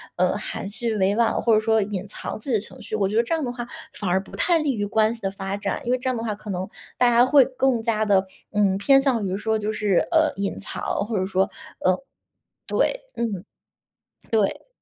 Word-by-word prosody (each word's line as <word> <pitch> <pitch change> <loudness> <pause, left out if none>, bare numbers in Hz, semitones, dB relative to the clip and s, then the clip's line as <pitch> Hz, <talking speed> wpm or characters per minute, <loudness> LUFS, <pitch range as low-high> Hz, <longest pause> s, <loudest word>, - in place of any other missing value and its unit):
呃， 185 +1 +2
含 205 -1 -5
蓄 225 +2 -2
委 195 0 +2
婉， 235 -1 +3
或 230 - +3
者 215 - +6
说 220 0 +2
隐 200 -1 -3
藏 205 - -6
自 245 - -9
己 - - +2
的 - - +3
情 - - -11
绪。 - - -12
我 195 - +3
觉 210 - -3
得 230 - +4
这 240 - -2
样 320 -2 0
的 245 - -2
话 240 -1 -6 0.3
反 205 - -4
而 185 +2 +2
不 - - -12
太 345 -2 +2
利 290 -4 0
于 205 -1 -1
关 215 +1 +2
系 230 - -10
的 195 - -1
发 195 0 -4
展， 205 - -3
因 240 - 0
为 255 - +3
这 255 +1 -5
样 255 - 0
的 225 - -3
话 215 -2 -2
可 210 +1 -11
能 185 +1 -3 0.3
大 245 - +5
家 240 +1 +6
会 275 +1 +7
更 260 -2 +1
加 220 -1 +1
地， 195 -2 +4 0.3
嗯， 200 -2 +2
偏 270 +7 +5
向 250 -6 +1
于 185 0 -1
说 220 +2 0
就 215 0 -2
是， 205 -4 +2
呃， 320 -2 +4
隐 200 0 -3
藏， - - -6 0.2
或 225 -2 -1
者 185 - +1
说， 190 0 +1 0.3
呃 185 0 +2 0.7
对， - - +1
嗯， 210 -5 -3 0.9
对。 215 -3 +1
215 Hz, 260 characters per minute, -24 LUFS, 200-240 Hz, 0.9 s, 会